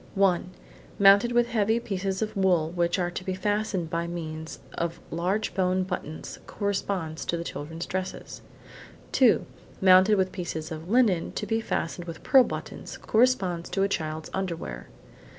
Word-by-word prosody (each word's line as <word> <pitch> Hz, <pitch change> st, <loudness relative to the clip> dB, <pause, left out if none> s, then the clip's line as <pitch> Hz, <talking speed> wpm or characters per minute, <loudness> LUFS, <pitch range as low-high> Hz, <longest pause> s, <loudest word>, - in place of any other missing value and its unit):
One: 190 Hz, -2 st, +2 dB, 0.5 s
mounted 200 Hz, +4 st, +6 dB
with 240 Hz, 0 st, +4 dB
heavy 225 Hz, 0 st, +2 dB
pieces 195 Hz, -2 st, -2 dB
of 215 Hz, -, -5 dB
wool 180 Hz, -5 st, +2 dB
which 175 Hz, 0 st, +1 dB
are 175 Hz, -1 st, -1 dB
to 180 Hz, -, -5 dB
be 185 Hz, 0 st, -2 dB
fastened 205 Hz, -4 st, -1 dB
by 170 Hz, 0 st, -1 dB
means 160 Hz, -2 st, -6 dB, 0.2 s
of 170 Hz, 0 st, -3 dB
large 185 Hz, +6 st, -1 dB
bone 185 Hz, 0 st, +1 dB
buttons–corresponds 185 Hz, 0 st, -4 dB
to 170 Hz, 0 st, -2 dB
children's 165 Hz, +1 st, -6 dB
dresses. 185 Hz, 0 st, -5 dB, 0.7 s
Two: -, -, +4 dB, 0.3 s
mounted 190 Hz, +2 st, +6 dB
with 190 Hz, -1 st, +1 dB
pieces 160 Hz, -4 st, -5 dB
of 160 Hz, +2 st, -7 dB
linen 215 Hz, -7 st, +3 dB
to -, -, -3 dB
be 225 Hz, 0 st, 0 dB
fastened 175 Hz, -4 st, -3 dB
with 165 Hz, -1 st, -8 dB
pearl 265 Hz, -2 st, +7 dB
buttons–corresponds 215 Hz, -10 st, -1 dB
to 195 Hz, -, 0 dB
a -, -, +3 dB
child's 155 Hz, -4 st, -3 dB
underwear. 165 Hz, -, -4 dB
185 Hz, 145 wpm, -27 LUFS, 170-200 Hz, 0.7 s, pearl